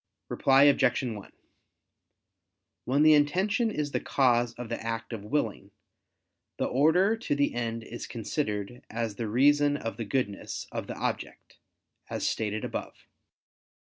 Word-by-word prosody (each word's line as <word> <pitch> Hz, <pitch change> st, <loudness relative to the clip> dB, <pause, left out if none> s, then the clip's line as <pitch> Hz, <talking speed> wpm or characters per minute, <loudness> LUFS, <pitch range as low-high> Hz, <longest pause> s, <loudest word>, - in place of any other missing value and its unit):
Reply 135 Hz, +1 st, +4 dB
Obj. 135 Hz, -3 st, +4 dB
1: 110 Hz, -5 st, -6 dB, 1.5 s
When 140 Hz, +4 st, +3 dB
the 155 Hz, 0 st, +7 dB
intention 190 Hz, +11 st, +2 dB
is 150 Hz, -8 st, -3 dB
the -, -, 0 dB
cause 120 Hz, -3 st, +2 dB
of 120 Hz, -1 st, -6 dB
the -, -, -4 dB
act 115 Hz, +1 st, -4 dB
of 105 Hz, -3 st, -6 dB
willing, 110 Hz, -6 st, -2 dB, 0.9 s
the -, -, 0 dB
order 170 Hz, -, +3 dB
to 225 Hz, -10 st, -2 dB
the 145 Hz, 0 st, +1 dB
end 115 Hz, -1 st, -3 dB
is 120 Hz, -, -7 dB
considered 115 Hz, -1 st, -3 dB
as 115 Hz, -3 st, -3 dB
the 115 Hz, -, -3 dB
reason 145 Hz, +5 st, +3 dB
of 115 Hz, -5 st, -5 dB
the 115 Hz, -, -4 dB
goodness 100 Hz, -3 st, -3 dB
of -, -, -4 dB
the -, -, -6 dB
object, -, -, -5 dB, 0.5 s
as -, -, -2 dB
stated 105 Hz, -1 st, -2 dB
above. -, -, -6 dB
125 Hz, 140 wpm, -28 LUFS, 115-145 Hz, 1.5 s, the